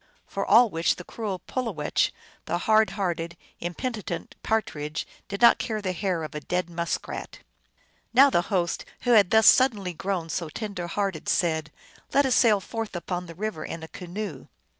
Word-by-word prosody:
" - - -36
For - - -3
all 235 -2 +6
which 165 +1 +1
the 180 - -9
cruel 205 -1 -4
Pulowech, 215 - 0 0.3
the 170 - -1
hard 215 +3 +4
hearted, 170 -3 -2 0.2
impenitent 175 0 -4
Partridge, 155 -9 -2 0.2
did 200 +4 -4
not 235 - +8
care 220 -2 -2
the 195 -3 -2
hair 180 -2 -1
of 155 - -6
a 150 - -3
dead 180 +1 -2
musk 170 0 -2
rat. - - -6 0.7
Now 270 +3 +7
the 175 - +3
host, 180 -5 0 0.2
who 245 - +1
had 205 -6 +6
thus 220 0 +5
suddenly 210 -9 +5
grown 180 -1 -3
so 165 -1 -3
tender 195 -1 -5
hearted, 195 -2 -2
said, 160 -3 +1 0.2
" - - -24
Let 280 0 +5
us 260 - +2
sail 215 -4 +5
forth 225 +1 -5
upon 180 +1 -4
the 165 - -10
river 205 -4 -3
in 165 - -6
a - - -6
canoe." 180 -4 -6
185 Hz, 180 wpm, -26 LUFS, 170-220 Hz, 0.7 s, not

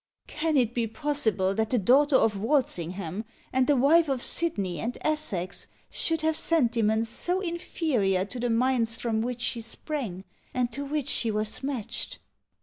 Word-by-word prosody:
Can 310 -1 -1
it 240 -3 +2
be 235 -2 0
possible 220 - 0
that 220 +1 0
the 250 - +2
daughter 270 +7 +4
of 220 -4 +4
Walsingham, 195 - -1 0.3
and 260 0 +3
the 290 - +4
wife 300 +5 +5
of 270 -2 0
Sidney 205 - 0
and 240 +2 -3
Essex, 205 - -1 0.2
should 325 -1 +1
have 315 0 +1
sentiments 230 -9 +2
so 355 +10 -1
inferior 305 - 0
to 245 +5 -7
the 240 0 0
minds 230 -1 +2
from 225 -1 -1
which 245 +1 -3
she 245 -1 -1
sprang, 230 - -5 0.3
and 245 -1 +1
to 280 +5 -4
which 285 -1 -2
she 235 -4 +1
was 215 0 -2
matched? 265 -6 -4
245 Hz, 160 wpm, -27 LUFS, 220-290 Hz, 0.3 s, wife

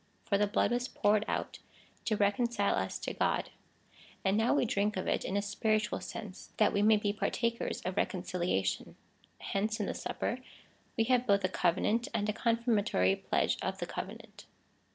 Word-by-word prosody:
For 200 - +1
the 210 - +3
blood 205 - +1
was 245 +1 0
poured 210 -2 +2
out - - -3 0.5
to 215 - +1
reconcile 205 +1 +2
us 95 0 -1
to - - -4
God, - - 0 0.7
and 190 +1 +3
now 225 +2 +3
we 285 - +3
drink 205 -2 0
of 185 - -2
it - - +1
in 195 - -1
a 200 - 0
spiritual 210 +1 0
sense, 200 -3 -8
that - - +4
we 205 - +2
may 215 +1 +6
be 205 -1 0
partakers 230 +2 -1
of 185 +1 -4
reconciliation. 175 - -1 0.4
Hence, 215 +3 -2
in 205 - 0
the - - -2
Supper, 245 - -3 0.6
we 225 - +4
have 250 +1 +2
both 200 -1 +4
a 185 - +2
covenant, 185 +7 +1
and 210 -2 0
a 210 - 0
confirmatory 220 - +2
pledge - - 0
of - - -2
the - - -3
covenant. - - -8
205 Hz, 175 wpm, -32 LUFS, 195-225 Hz, 0.7 s, may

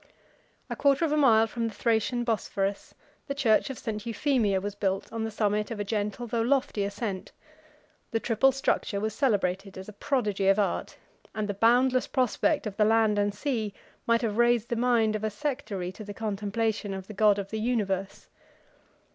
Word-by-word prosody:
A - - -4
quarter 280 +3 +3
of 310 - -1
a - - +2
mile 230 -7 +5
from 230 +1 -3
the 220 - -7
Thracian 235 +1 +1
Bosphorus, 200 -3 -2 0.3
the 280 - -3
church 245 -2 +2
of 265 - -5
St. 215 -2 -4
Euphemia 230 -3 +1
was 205 +1 -4
built 195 0 -2
on 225 -1 -2
the 225 - -2
summit 210 -1 0
of 225 -3 -5
a - - 0
gentle 210 +2 -2
though 235 0 -1
lofty 250 -4 +1
ascent: 200 -1 -4 0.8
the 225 - 0
triple 235 +4 +3
structure 260 -6 -1
was 215 +1 -2
celebrated 195 -6 0
as 190 - -8
a 215 - -9
prodigy 210 -5 -1
of 195 +1 +5
art, 205 -2 -1 0.4
and 215 -1 -2
the 205 - -2
boundless 250 +5 +3
prospect 260 +3 +1
of 205 -2 -5
the 215 - +4
land 220 -1 +3
and 205 0 0
sea 220 -4 -2 0.3
might 230 +1 +3
have 220 0 -1
raised 240 -1 +3
the 235 - 0
mind 230 -2 +2
of 215 - -4
a 215 - +1
sectary 210 -6 -4
to 215 - -10
the 205 -1 -8
contemplation 210 -1 -2
of 190 -1 -7
the 215 - -9
God 210 -1 +4
of 195 -1 -5
the 220 - -2
universe. 200 -5 -2
220 Hz, 190 wpm, -27 LUFS, 205-240 Hz, 0.8 s, mile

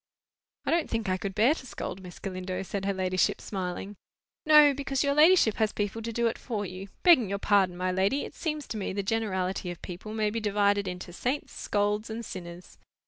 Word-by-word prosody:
"I - - 0
don't 335 -1 +1
think 225 -2 -2
I 185 - +1
could 195 0 -5
bear 230 +7 +5
to 260 -5 -9
scold, 190 - -6
Miss 180 -1 -10
Galindo," 185 -1 -4
said 195 +1 -4
her 200 - +1
ladyship, 185 -1 +1
smiling. 190 +1 -5 0.5
"No! 300 -2 +8
because 275 0 -1
your 280 0 +2
ladyship 305 - +5
has 220 -1 +2
people 205 +2 -2
to 230 +1 -4
do 235 +1 0
it 230 - 0
for 215 -5 -3
you. 185 +1 -7 0.2
Begging 295 - +6
your 200 - -1
pardon, 195 -3 +2
my 185 0 0
lady, 195 +10 +1
it - - -10
seems 305 -2 -3
to 220 - -3
me 195 - -3
the 200 0 -2
generality 190 -4 -1
of 175 - -6
people 185 +4 -7
may 215 -1 +1
be 230 - -2
divided 205 -1 +1
into 180 -1 -6
saints, 255 +10 -2
scolds, 210 +1 -1
and 225 +1 -5
sinners. 175 -2 -9
205 Hz, 210 wpm, -28 LUFS, 185-230 Hz, 0.5 s, No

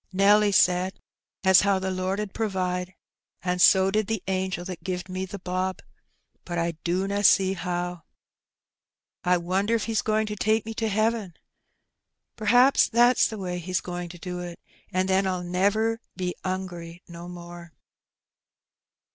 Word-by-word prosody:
'^ - - -67
Nelly 205 +2 +4
said 185 0 +2 0.4
as 190 -2 +6
how 200 -1 +2
the 190 0 -2
Lord 185 +2 -2
'ud 210 -2 -4
provide, 185 -4 -2 0.5
an' 180 0 -1
so 190 +1 +6
did 215 0 0
the 220 -4 -2
angel 185 -2 -2
that 180 -3 -7
gived 180 0 -4
me 185 +1 -3
the 200 - -7
bob; 185 0 -3 0.6
but 175 -1 -5
I 170 0 0
dunna 195 +4 -1
see 190 -1 +5
how. 175 -1 -3 1.2
I 180 0 +3
wonder 190 +6 0
if 225 - -1
He's 225 -2 0
goin' 220 0 +1
to 210 0 -4
take 220 +2 +1
me 225 - -5
to 225 0 -2
heaven? 215 -3 0 1.0
Pr'aps 245 +5 +4
that's 240 +2 +4
the 220 - -7
way 180 -2 -4
He's 185 +2 -2
goin' 175 -1 -6
to 175 - -10
do 180 0 -6
it, 175 -1 -7 0.3
an' 185 +1 +1
then 190 +1 +2
I'll 185 -1 -2
never 205 +6 0
be 180 -1 -2
'ungry 180 -2 -5
no 170 0 -9
more." 175 -1 -10
185 Hz, 160 wpm, -26 LUFS, 180-205 Hz, 1.2 s, as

